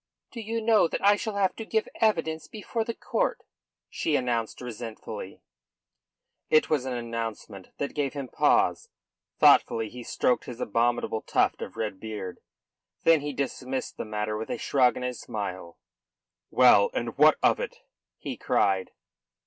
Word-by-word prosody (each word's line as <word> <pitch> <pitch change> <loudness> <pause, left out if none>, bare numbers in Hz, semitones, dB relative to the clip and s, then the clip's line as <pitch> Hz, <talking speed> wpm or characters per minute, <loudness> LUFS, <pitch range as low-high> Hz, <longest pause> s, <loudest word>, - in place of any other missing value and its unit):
"Do 235 - -6
you 225 +1 -3
know 220 -5 +5
that 190 - -3
I 205 +1 +7
shall 215 0 -4
have 195 -2 +1
to 225 - -4
give 220 0 -1
evidence 165 -8 0
before 220 +2 -3
the 230 0 -4
court?" - - -1 0.5
she 155 - -1
announced 120 -4 -1
resentfully. 110 -4 -7 1.1
It 155 0 +4
was 145 -4 +1
an 130 - -2
announcement 115 -5 -5
that 140 - -3
gave 145 -3 -1
him 140 -3 -5
pause. - - +2 0.5
Thoughtfully 110 -1 +5
he 125 +2 -9
stroked 125 +1 0
his 120 -1 -8
abominable 115 0 0
tuft - - +1
of - - -7
red 105 -4 -3
beard. 105 -4 -6 0.6
Then 165 -2 +5
he 145 0 -3
dismissed 135 -1 -4
the - - -3
matter 105 0 -2
with 110 - -5
a - - -2
shrug 130 -3 +3
and 125 - -4
a 125 - -2
smile. 95 -7 -6 0.7
"Well, 125 -5 +6
and 115 -1 -2
what 155 +1 +7
of - - +4
it?" - - -5 0.4
he - - -6
cried. 95 -2 +1
125 Hz, 155 wpm, -27 LUFS, 110-160 Hz, 1.1 s, I